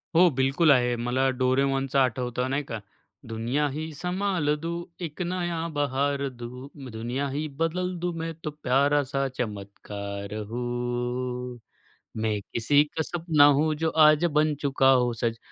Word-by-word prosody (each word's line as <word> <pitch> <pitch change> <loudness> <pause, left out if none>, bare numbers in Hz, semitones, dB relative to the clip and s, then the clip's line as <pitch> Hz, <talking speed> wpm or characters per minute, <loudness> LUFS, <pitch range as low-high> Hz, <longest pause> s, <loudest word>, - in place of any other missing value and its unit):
हो, 175 +2 +7
बिलकुल 135 +4 +4
आहे. 125 -2 +3
मला 125 +3 +1
डोरेमॉनचं 135 +1 +2
आठवतं, 125 0 0
नाही 140 +2 0
का. 115 - -3 0.5
दुनिया 120 +7 0
ही 155 +3 -4
संभाल 180 -2 0
दूँ, 170 +1 -3 0.2
एक 155 +2 -7
नया 175 -2 -2
बहार 140 0 0
दूँ, 125 +2 -9 0.2
दुनिया 120 +5 -3
ही 155 +2 -1
बदल 180 +3 0
दूँ, 175 0 -2
मैं 165 0 -3
तो 150 - -3
प्यारा 145 0 +2
सा 135 0 +1
चमत्कार 100 -2 -5 0.2
हूँ, 125 +1 -3 0.6
मैं 110 -2 0
किसी 145 +5 +4
का 160 - -1
सपना 160 -3 +3
हूँ, 155 +1 +2
जो 160 - +2 0.2
आज 155 +2 +5
बन 155 0 +3
चुका 135 -1 +4
हूँ 125 -2 +3
सच, 115 0 -2
135 Hz, 145 wpm, -26 LUFS, 125-155 Hz, 0.6 s, हो